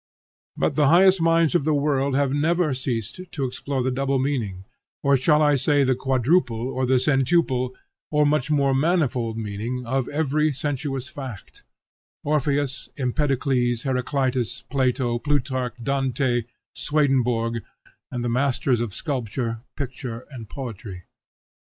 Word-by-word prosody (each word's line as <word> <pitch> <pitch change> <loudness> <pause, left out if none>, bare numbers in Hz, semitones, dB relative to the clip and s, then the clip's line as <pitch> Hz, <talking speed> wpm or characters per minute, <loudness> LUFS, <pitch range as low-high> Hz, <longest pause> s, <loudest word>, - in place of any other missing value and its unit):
But - - +1
the 150 -2 +3
highest 185 +3 +6
minds 165 -1 +3
of 175 - +2
the 155 +1 +2
world 140 -2 +1
have 140 -1 +2
never 160 +1 +2
ceased 125 - -3
to 145 -6 -2
explore 130 +1 -3
the 130 - 0
double 135 +1 0
meaning, 115 -9 -2 0.4
or 140 0 +4
shall 150 +3 +3
I 145 -1 +4
say 145 +1 +3
the 130 -1 +3
quadruple 130 0 +1
or 130 -1 -1
the 130 - +3
centuple 130 -1 +2 0.3
or 150 -1 +3
much 145 -2 +1
more 140 -2 +3
manifold 135 -7 +1
meaning, 115 +4 -4
of 130 +1 -1
every 150 0 +1
sensuous 135 -1 -3
fact; 135 - -9 0.6
Orpheus, 145 -2 0
Empedocles, 130 -3 0
Heraclitus, 125 -3 -1
Plato, 125 -3 +1
Plutarch, 130 -2 -1
Dante, 130 -2 0 0.3
Swedenborg, 125 -6 +1 0.5
and 120 -1 -3
the - - +1
masters 125 0 +1
of 115 -5 -4
sculpture, 115 -4 -3
picture, 125 -3 -5
and 115 -6 -9
poetry. 105 -8 -7
130 Hz, 135 wpm, -24 LUFS, 120-145 Hz, 0.6 s, highest